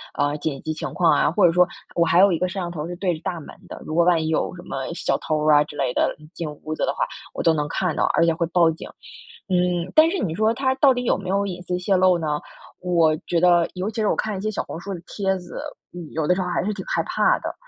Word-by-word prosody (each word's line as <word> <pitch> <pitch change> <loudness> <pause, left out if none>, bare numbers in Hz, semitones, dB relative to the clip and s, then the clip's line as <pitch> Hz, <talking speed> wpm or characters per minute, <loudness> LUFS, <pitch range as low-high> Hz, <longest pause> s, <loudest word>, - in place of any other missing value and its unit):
呃， 145 0 0
紧 145 -3 -4
急 155 - -3
情 155 - -6
况 170 -3 +3
啊， - - +2
或 185 +3 +3
者 170 - +5
说 180 +1 +4 0.3
我 170 - +3
还 170 - +3
有 195 +1 +6
一 170 - +1
个 180 - 0
摄 190 +2 -5
像 175 -2 -3
头 150 -3 -5
儿 - - -5
是 175 - -5
对 180 0 0
着 155 - -11
大 175 -2 -3
门 - - -11
的， - - -9
如 155 - -5
果 170 0 +4
万 170 -2 +3
一 - - -1
有 160 +2 -1
什 175 - -11
么 180 - -6 0.2
小 170 - -1
偷 155 -1 -2
儿 155 -1 +6
啊， 145 - +5
之 150 - -12
类 130 -3 -1
的 - - +1 0.2
进 165 -3 -5
屋 150 +1 -7
子 - - -1
的 - - -1
话， - - 0 0.3
我 - - -4
都 165 - +4
能 150 -1 -1
看 180 +1 -1
到， - - +1
而 165 - +4
且 165 - +3
会 165 +1 -1
报 170 -1 +3
警。 160 - -9 0.6
嗯， 180 -1 0
但 315 +1 +7
是 385 - -2
你 160 - -2
说 215 +5 +2
它 260 +2 0
到 270 0 +5
底 245 0 -3
有 - - +1
没 190 -1 -7
有 200 +1 +1
隐 180 -2 -5
私 180 0 -3
泄 185 +2 +1
露 185 -1 +4
呢？ 150 -2 -1 0.4
我 170 -3 +2
觉 170 - +1
得 175 -1 +4
尤 185 +3 -3
其 220 0 -3
是 215 - +1
我 - - +2
看 215 -2 -2
一 190 - -5
些 215 - -1
小 210 - -3
红 - - -7
书 195 +2 -6
的 175 - -7
帖 190 -2 -1
子， 175 -1 -9 0.3
嗯， 180 - -8
有 160 -1 -1
的 180 - +4
时 185 - -1
候 180 - -2
还 180 - -1
是 210 - -1
挺 190 -2 -7
害 - - 0
怕 - - +2
的， - - -5
175 Hz, 325 characters per minute, -23 LUFS, 160-190 Hz, 0.6 s, 但